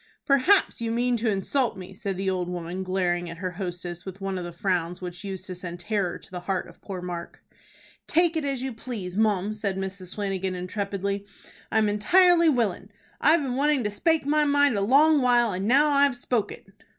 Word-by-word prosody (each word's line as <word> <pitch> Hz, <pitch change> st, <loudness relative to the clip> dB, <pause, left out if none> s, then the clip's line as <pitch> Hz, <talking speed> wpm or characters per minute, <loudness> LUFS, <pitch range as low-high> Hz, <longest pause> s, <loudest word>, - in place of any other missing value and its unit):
"Perhaps 280 Hz, +4 st, +3 dB
you 230 Hz, -, -1 dB
mean 245 Hz, +1 st, +1 dB
to 225 Hz, 0 st, 0 dB
insult 215 Hz, +4 st, 0 dB
me," 185 Hz, 0 st, -9 dB
said 195 Hz, -1 st, -4 dB
the 190 Hz, 0 st, -3 dB
old 180 Hz, -2 st, -1 dB
woman, 175 Hz, +1 st, -4 dB
glaring 180 Hz, -2 st, -1 dB
at 165 Hz, -, -8 dB
her 185 Hz, +1 st, -3 dB
hostess 175 Hz, -1 st, -6 dB
with 190 Hz, 0 st, -8 dB
one 195 Hz, -1 st, -3 dB
of -, -, -5 dB
the 175 Hz, -, -6 dB
frowns 175 Hz, -1 st, -1 dB
which 180 Hz, +1 st, -7 dB
used 190 Hz, -2 st, -6 dB
to 185 Hz, -, -6 dB
send 175 Hz, -1 st, -7 dB
terror 195 Hz, -1 st, -1 dB
to -, -, -18 dB
the 180 Hz, -, -5 dB
heart 185 Hz, +1 st, -2 dB
of -, -, -17 dB
poor 185 Hz, -3 st, -6 dB
Mark. 175 Hz, -1 st, -7 dB, 0.6 s
"Take 340 Hz, 0 st, +3 dB
it 320 Hz, -, 0 dB
as 275 Hz, -3 st, -2 dB
you 265 Hz, -1 st, -3 dB
please, 220 Hz, -6 st, -6 dB
mum," 210 Hz, -1 st, +1 dB
said 200 Hz, -3 st, -3 dB
Mrs. 190 Hz, -1 st, -6 dB
Flanagan, 195 Hz, -2 st, -2 dB
intrepidly. 200 Hz, +2 st, -3 dB, 0.4 s
"I'm 220 Hz, 0 st, +3 dB
entirely 335 Hz, -, +5 dB
willin'. 215 Hz, -, 0 dB, 0.3 s
I've 310 Hz, +1 st, +4 dB
been 255 Hz, -2 st, -2 dB
wanting 285 Hz, -1 st, +2 dB
to 210 Hz, -, -1 dB
spake 320 Hz, +8 st, +1 dB
my 300 Hz, +1 st, +3 dB
mind 285 Hz, -3 st, +3 dB
a 200 Hz, -, 0 dB
long 285 Hz, +7 st, +5 dB
while, 240 Hz, -3 st, +3 dB
and 190 Hz, +3 st, -2 dB
now 280 Hz, +5 st, +5 dB
I've 280 Hz, -2 st, +3 dB
spoke 245 Hz, -3 st, -1 dB
it." -, -, -11 dB
200 Hz, 205 wpm, -26 LUFS, 185-255 Hz, 0.6 s, entirely